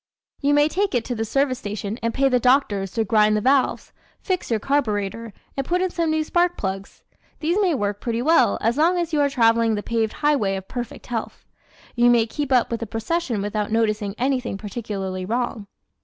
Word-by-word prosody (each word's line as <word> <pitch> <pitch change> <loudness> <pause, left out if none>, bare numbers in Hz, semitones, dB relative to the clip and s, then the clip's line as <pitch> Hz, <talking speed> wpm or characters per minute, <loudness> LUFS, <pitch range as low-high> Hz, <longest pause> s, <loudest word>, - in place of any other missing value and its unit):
¶ - - -71 0.4
You 290 +1 +3
may 290 0 +5
take 385 0 -1
it 235 - 0
to 250 - -3
the 225 -1 -2
service 260 +2 0
station 210 0 -5
and 230 - 0
pay 275 +3 +2
the 250 -2 +2
doctors 240 -7 +2
to 225 - +1
grind 215 0 +3
the - - +1
valves, 265 +3 +1 0.3
fix 370 -2 -2
your 225 -2 +1
carbureter 230 -4 -1 0.2
and 275 - -1
put 350 +6 0
in 370 -1 0
some 335 -2 -1
new 315 0 +1
spark 350 +2 +1
plugs. 195 0 -5 0.4
These 335 +6 0
may 360 -6 +2
work 205 -4 -2
pretty 235 0 -2
well 295 -5 +4
as 230 +4 +1
long 345 +3 +3
as 340 -2 -2
you 295 - +3
are 285 - +3
traveling 230 -4 +3
the 205 - -4
paved 225 -2 -1
highway 270 -10 +1
of 190 0 -7
Perfect 245 -2 -6
Health; 230 -2 -5 0.5
you 240 0 +4
may 235 -2 +4
keep 280 +4 -4
up 250 -2 +3
with 230 - -2
the 230 - -5
procession 230 0 -2
without 210 0 -2
noticing 215 -2 0
anything 255 -4 -1
particularly 195 -3 -5
wrong. 225 0 -2
235 Hz, 210 wpm, -22 LUFS, 215-285 Hz, 0.5 s, may